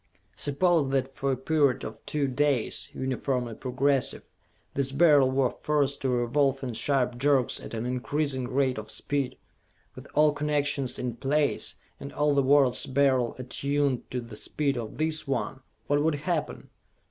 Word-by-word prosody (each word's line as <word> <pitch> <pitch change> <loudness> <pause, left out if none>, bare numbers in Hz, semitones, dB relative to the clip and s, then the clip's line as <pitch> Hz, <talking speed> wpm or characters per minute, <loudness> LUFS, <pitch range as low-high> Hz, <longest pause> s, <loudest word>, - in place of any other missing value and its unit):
"Suppose 145 - +2
that 135 0 0
for 135 0 -1
a 130 - 0
period 140 -1 +1
of - - -8
two 145 -2 0
days, 135 -2 0
uniformly 130 -2 -2
progressive, 135 +3 0 0.5
this 135 -1 -1
Beryl 145 -2 +5
were 130 -1 +2
forced 145 -2 0
to 135 - 0
revolve 135 +3 +1
in 125 -2 -3
sharp 125 +1 0
jerks 135 -2 +2
at - - -8
an 110 +1 -3
increasing 130 +1 -1
rate 130 -2 +1
of 110 - -9
speed! 140 -3 -2 0.6
With - - -11
all 150 0 +5
connections 145 -3 0
in 120 -2 -4
place, 145 +3 0 0.2
and 140 - -7
all 150 0 +2
the 140 - +3
world's 135 -1 +3
Beryls 130 -3 +2
attuned 140 0 -1
to 125 - -3
the 115 -2 -10
speed 140 +6 -1
of 115 -1 -5
this 155 0 0
one 135 0 -2 0.3
what 145 0 +2
would 160 0 +2
happen? 155 +2 -3
135 Hz, 160 wpm, -27 LUFS, 125-145 Hz, 0.6 s, Beryl